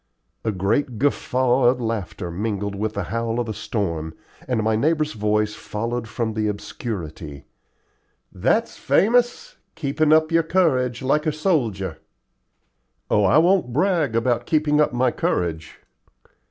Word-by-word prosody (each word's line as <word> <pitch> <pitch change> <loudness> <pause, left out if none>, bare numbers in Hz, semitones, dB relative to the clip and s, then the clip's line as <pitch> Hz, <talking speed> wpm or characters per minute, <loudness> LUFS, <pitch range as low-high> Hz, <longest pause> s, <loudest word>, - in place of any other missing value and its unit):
A 110 - 0
great 110 +6 0
guffaw 130 -1 +1
of 125 +1 +4
laughter 105 -6 -4
mingled 100 +2 -3
with 105 +2 -3
the 100 - -1
howl 115 +3 -2
of 120 - -1
the 110 - -4
storm, 85 -8 -3 0.3
and 120 -4 0
my 110 0 +2
neighbor's 155 +5 +1
voice 105 0 0
followed 115 +3 -4
from 110 0 -3
the 110 0 -1
obscurity: 90 - -6 0.9
"That's - - 0
famous 245 - +1 0.2
keepin' 155 0 0
up 155 +1 +4
your 165 0 +4
courage 135 -8 +1
like 150 +4 +1
a - - +3
soldier." 115 - -1 1.1
"Oh, 105 - +4
I 95 - +4
won't 175 -6 +3
brag 155 - +1
about 115 +1 0
keeping 150 -1 +2
up 150 - +2
my 125 0 +1
courage." 80 -6 -2
115 Hz, 140 wpm, -22 LUFS, 105-150 Hz, 1.1 s, of